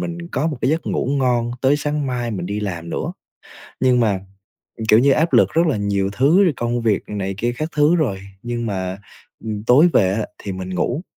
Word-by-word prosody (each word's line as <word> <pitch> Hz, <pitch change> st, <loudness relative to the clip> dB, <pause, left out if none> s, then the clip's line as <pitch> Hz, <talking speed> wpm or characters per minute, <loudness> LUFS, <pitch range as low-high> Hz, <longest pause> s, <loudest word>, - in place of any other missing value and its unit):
mình 170 Hz, -1 st, -5 dB
có 160 Hz, -, -1 dB
một 155 Hz, -3 st, -2 dB
cái 130 Hz, -, +1 dB
giấc 160 Hz, +1 st, -1 dB
ngủ -, -, -1 dB
ngon 120 Hz, -3 st, +1 dB
tới 135 Hz, +2 st, +4 dB
sáng 150 Hz, -1 st, -2 dB
mai 120 Hz, -2 st, -2 dB
mình 90 Hz, -4 st, -4 dB
đi 100 Hz, +2 st, -3 dB
làm 85 Hz, -5 st, -5 dB
nữa, -, -, -3 dB, 0.7 s
nhưng 125 Hz, -1 st, +3 dB
mà, 105 Hz, -5 st, +1 dB, 0.7 s
kiểu 110 Hz, -, +7 dB
như, 135 Hz, +4 st, +4 dB
áp 160 Hz, +4 st, +1 dB
lực -, -, +5 dB
rất 165 Hz, +2 st, +3 dB
là 150 Hz, -, +1 dB
nhiều 100 Hz, -1 st, 0 dB
thứ 145 Hz, -, +4 dB
rồi 175 Hz, -, +3 dB
công 120 Hz, 0 st, -1 dB
việc 110 Hz, -4 st, +1 dB
này 95 Hz, -2 st, -3 dB
kia 120 Hz, +3 st, 0 dB
các 155 Hz, -, -2 dB
thứ 150 Hz, +3 st, +4 dB
rồi, 125 Hz, -, 0 dB, 0.2 s
nhưng 120 Hz, -1 st, -3 dB
mà, 95 Hz, -2 st, -3 dB, 0.5 s
ừm, 105 Hz, -1 st, -4 dB
tối 135 Hz, +9 st, +6 dB
về 95 Hz, -2 st, +3 dB
á 105 Hz, +2 st, -1 dB
thì 100 Hz, -, -6 dB
mình 95 Hz, 0 st, -6 dB
ngủ, 120 Hz, -, -1 dB
120 Hz, 220 wpm, -20 LUFS, 100-150 Hz, 0.7 s, kiểu